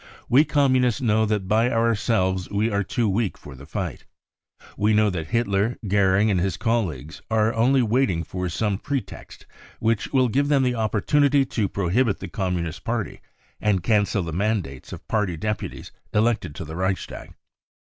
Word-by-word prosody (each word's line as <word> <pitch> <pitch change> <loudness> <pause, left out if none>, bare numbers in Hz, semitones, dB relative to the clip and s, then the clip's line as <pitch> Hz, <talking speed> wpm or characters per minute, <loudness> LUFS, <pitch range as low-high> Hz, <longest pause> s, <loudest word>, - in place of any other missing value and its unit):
We 140 +5 +5
Communists 130 -6 +2
know 110 -3 +2
that 105 -3 -1
by 110 +4 +3
our 115 -1 +2
selves 95 -4 0
we 105 +3 0
are 100 0 +1
too 120 +1 -1
weak 100 +1 -1
for 70 - -11
the 70 +2 -12
fight. 85 -4 -5 0.7
We 105 +1 +2
know 105 -1 +3
that 80 -3 -4
Hitler, 115 -1 0
Goering 100 +1 +3
and 95 - +1
his 95 -1 -1
colleagues 80 - -2
are 110 0 +2
only 125 +3 +3
waiting 115 -7 +1
«for 90 0 -4
some 100 +3 -1
pretext 130 -9 -6 0.3
which 115 -1 0
will 130 -2 +3
give 140 +5 +1
them 140 -2 +3
the 125 -1 +1
opportunity 135 +6 +2
to 110 -6 -1
pro 90 -4 -2
hibit 115 -1 +2
the - - -7
Communist 90 -6 -3
Party 115 -3 -3 0.4
and 100 -5 +1
cancel 105 -3 +1
the 80 -1 -5
mainlates 95 - -2
of - - -9
party 105 -6 0
deputies 105 +5 -4 0.2
elected 105 -8 +1
to 85 - -6
the 80 - -8
Reicnstag. 95 +1 -3
105 Hz, 170 wpm, -23 LUFS, 95-115 Hz, 0.7 s, We